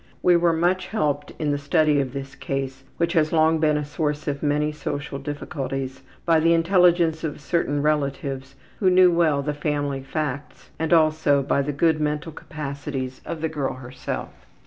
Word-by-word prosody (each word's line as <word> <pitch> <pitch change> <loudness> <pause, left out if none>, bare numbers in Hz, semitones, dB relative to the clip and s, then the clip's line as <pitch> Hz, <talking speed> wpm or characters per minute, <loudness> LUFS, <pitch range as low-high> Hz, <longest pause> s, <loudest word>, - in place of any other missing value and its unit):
We 180 - +6
were 170 0 +4
much 180 +3 +1
helped 145 -9 -1
in 150 -2 0
the 145 - -1
study 150 0 +3
of 130 -2 -4
this 135 0 -6
case, 135 -1 -4
which 170 +1 0
has 155 -3 +2
long 160 0 +3
been 150 -1 +3
a 150 - -2
source 150 0 -2
of 140 -1 -2
many 150 0 +1
social 145 -1 -5
difficulties, 135 -2 -5 0.2
by 165 -2 +4
the 165 +1 +4
intelligence 170 -2 +3
of 150 -2 -3
certain 145 -1 0
relatives 140 -3 -1 0.2
who 190 - +4
knew 185 0 +6
well 160 -4 +2
the 150 +1 -1
family 145 -2 -2
facts, 140 0 -5
and 160 -1 -1
also 155 -3 +4
by 140 - +1
the 145 +2 -2
good 155 +2 +2
mental 150 +2 -1
capacities 140 -4 -6
of 160 - -5
the 160 - 0
girl 145 -5 -2
herself. 130 0 -6
150 Hz, 175 wpm, -24 LUFS, 140-160 Hz, 0.2 s, We